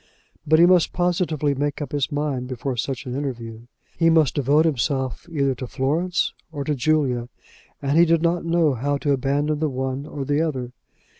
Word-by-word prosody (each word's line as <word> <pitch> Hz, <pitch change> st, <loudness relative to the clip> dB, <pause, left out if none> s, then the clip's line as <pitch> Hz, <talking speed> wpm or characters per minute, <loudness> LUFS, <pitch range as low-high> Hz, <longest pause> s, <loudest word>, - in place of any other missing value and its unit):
But 155 Hz, +1 st, +5 dB
he 170 Hz, -, +7 dB
must 180 Hz, -2 st, +4 dB
positively 175 Hz, -5 st, 0 dB
make 145 Hz, +1 st, -2 dB
up 145 Hz, -4 st, -5 dB
his 145 Hz, -2 st, -1 dB
mind 145 Hz, -4 st, -2 dB
before 130 Hz, +1 st, -3 dB
such 130 Hz, +2 st, -3 dB
an 125 Hz, -, -5 dB
interview. 120 Hz, -5 st, -5 dB, 0.3 s
He 165 Hz, -1 st, +5 dB
must 160 Hz, -5 st, +4 dB
devote 145 Hz, +3 st, +3 dB
himself 135 Hz, -1 st, -1 dB
either 140 Hz, -4 st, +1 dB
to 130 Hz, 0 st, -6 dB
Florence 155 Hz, +8 st, 0 dB, 0.2 s
or 145 Hz, -3 st, -4 dB
to 150 Hz, -, -1 dB
Julia; 130 Hz, -3 st, 0 dB, 0.5 s
and 140 Hz, +4 st, +2 dB
he 170 Hz, -, +7 dB
did 165 Hz, 0 st, +2 dB
not 170 Hz, +1 st, +1 dB
know 165 Hz, -3 st, +2 dB
how 140 Hz, +4 st, -1 dB
to 145 Hz, +1 st, -1 dB
abandon 145 Hz, +3 st, 0 dB
the 155 Hz, -1 st, 0 dB
one 130 Hz, +2 st, -3 dB
or 140 Hz, -2 st, -5 dB
the 145 Hz, +3 st, +1 dB
other. 130 Hz, -7 st, -2 dB
145 Hz, 190 wpm, -23 LUFS, 130-160 Hz, 0.5 s, he